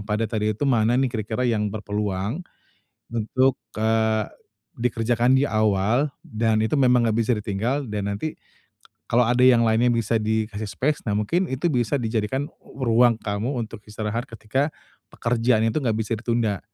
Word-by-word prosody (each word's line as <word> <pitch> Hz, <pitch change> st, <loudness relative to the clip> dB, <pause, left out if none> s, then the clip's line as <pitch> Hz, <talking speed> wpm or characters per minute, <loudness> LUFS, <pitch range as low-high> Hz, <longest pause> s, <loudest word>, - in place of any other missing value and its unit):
padat 105 Hz, +2 st, -2 dB
tadi 110 Hz, -1 st, 0 dB
itu, -, -, -2 dB
"Mana 120 Hz, -3 st, +3 dB
nih, 130 Hz, -1 st, +1 dB
kira-kira 110 Hz, +2 st, -2 dB
yang 110 Hz, -4 st, +1 dB
berpeluang 105 Hz, -, -3 dB, 0.7 s
untuk, 130 Hz, +3 st, +1 dB, 0.2 s
eee, 110 Hz, 0 st, +1 dB, 0.5 s
dikerjakan 120 Hz, +1 st, +1 dB
di 135 Hz, +2 st, +3 dB
awal, 110 Hz, +6 st, +1 dB
dan, 110 Hz, -1 st, 0 dB
itu 110 Hz, +7 st, +1 dB
memang 125 Hz, -2 st, +4 dB
nggak 110 Hz, -, 0 dB
bisa 115 Hz, +1 st, +2 dB
ditinggal," 110 Hz, +6 st, -2 dB
dan, 100 Hz, -1 st, -2 dB
nanti 155 Hz, +10 st, -4 dB, 0.7 s
kalau 120 Hz, +1 st, +3 dB
ada 120 Hz, +2 st, +1 dB
yang 120 Hz, -2 st, +6 dB
lainnya, 115 Hz, +2 st, +3 dB
bisa 115 Hz, -1 st, +1 dB
dikasih 110 Hz, -1 st, -2 dB
space. 150 Hz, +8 st, -1 dB
Nah, 105 Hz, -, +1 dB
mungkin 170 Hz, -, 0 dB
itu 135 Hz, +6 st, -1 dB
bisa 125 Hz, 0 st, +1 dB
dijadikan 120 Hz, +3 st, -1 dB, 0.2 s
ruang 120 Hz, -2 st, +2 dB
kamu 110 Hz, +5 st, -3 dB
untuk 110 Hz, 0 st, -9 dB
istirahat, 110 Hz, +4 st, -4 dB
ketika, 115 Hz, +4 st, -1 dB, 0.4 s
pekerjaan 115 Hz, -1 st, +1 dB
itu 155 Hz, -, 0 dB
nggak 115 Hz, -6 st, 0 dB
bisa 110 Hz, 0 st, -3 dB
ditunda. 115 Hz, -4 st, 0 dB
115 Hz, 155 wpm, -24 LUFS, 110-125 Hz, 0.7 s, yang